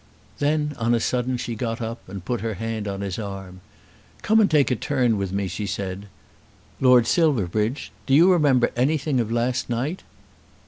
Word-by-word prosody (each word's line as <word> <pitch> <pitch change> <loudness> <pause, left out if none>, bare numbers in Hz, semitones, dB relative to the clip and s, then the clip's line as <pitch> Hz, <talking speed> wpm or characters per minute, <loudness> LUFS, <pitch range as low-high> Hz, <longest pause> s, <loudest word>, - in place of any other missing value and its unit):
Then 150 0 0
on 115 +1 +2
a - - +1
sudden 125 +2 -1
she 120 - -4
got 115 0 -3
up 115 -3 -6
and 95 -1 -8
put 120 -2 -2
her 110 -1 -3
hand 110 +1 -4
on 100 0 -4
his 100 -1 -4
arm. 95 -3 -7 0.6
"Come 220 +1 +4
and 210 - +4
take 145 -4 +3
a - - +2
turn 125 -2 +1
with 100 -2 -3
me," 100 0 -1
she 95 +3 -4
said. 100 0 -4 0.7
"Lord 125 -3 +5
Silverbridge, 115 - 0 0.2
do 135 - +4
you 175 +5 +6
remember 145 -8 +3
anything 140 +2 +1
of 115 -2 -1
last 120 +2 -1
night?" 130 +10 -2
120 Hz, 180 wpm, -23 LUFS, 100-135 Hz, 0.7 s, you